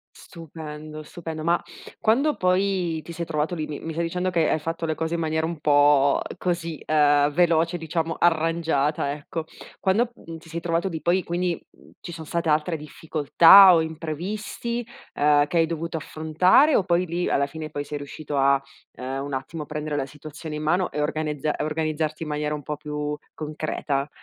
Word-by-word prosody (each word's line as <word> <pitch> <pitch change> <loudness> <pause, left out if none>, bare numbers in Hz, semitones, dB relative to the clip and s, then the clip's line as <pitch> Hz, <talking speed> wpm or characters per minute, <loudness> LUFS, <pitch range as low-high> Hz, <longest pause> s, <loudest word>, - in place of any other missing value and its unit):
Stupendo, 155 -2 -9
stupendo. 160 -1 -7
Ma 170 +1 +2 0.4
quando 275 +8 +2
poi 185 -3 +1
ti 170 - -9
sei 170 0 -4
trovato 155 +1 -1
lì, 155 -3 -3
mi 150 - -6
mi 165 - -6
stai 170 +2 -1
dicendo 180 +2 -1
che 165 -3 +2
hai - - +2
fatto 165 +2 -3
le 155 - -1
cose 160 +1 -2
in 170 - -1
maniera 160 0 0
un 165 -2 -4
po' 145 -1 +4 0.2
così, 170 -3 -3
ehm, 145 -1 +3
veloce 170 +1 +2
diciamo 165 0 -2
arrangiata 160 -4 +1
ecco, 155 +2 -5 0.3
quando 230 +6 +1
n 165 0 -7
ti 165 - -17
sei 170 +1 -4
trovato 170 +3 0
lì, 160 -2 -5
poi 180 +2 +2
quindi 175 0 -2 0.4
ci 175 - -7
sono 160 -1 -8
state 170 +1 -1
altre 155 +3 +1
difficoltà 160 +5 +6
o 165 - +4
imprevisti, 185 +9 -4 0.3
ehm, 145 0 +4
che 170 - -1
hai 165 - +5
dovuto 165 0 -3
affrontare 160 - +3
o 195 - +3
poi 180 0 +1
lì 175 +1 -2
alla 140 - +2
fine 155 +2 -7
poi 145 -1 -4
sei 145 0 -5
riuscito 145 +1 -6
a, 140 0 +4 0.3
ehm, 135 +2 -4
un 140 -1 -6
attimo 150 +4 -4
a - - -11
prendere 150 -1 -4
la 135 -2 -1
situazione 150 +2 -8
in 150 - -4
mano 175 +4 +1
e 150 - -2
organezza 150 -1 -1
organizzarti 155 0 -2
in 155 - -6
maniera 150 0 -1
un 145 - -8
po' 150 -1 -4
più 150 0 -4 0.2
concreta? 150 -2 -3
160 Hz, 185 wpm, -24 LUFS, 150-170 Hz, 0.4 s, difficoltà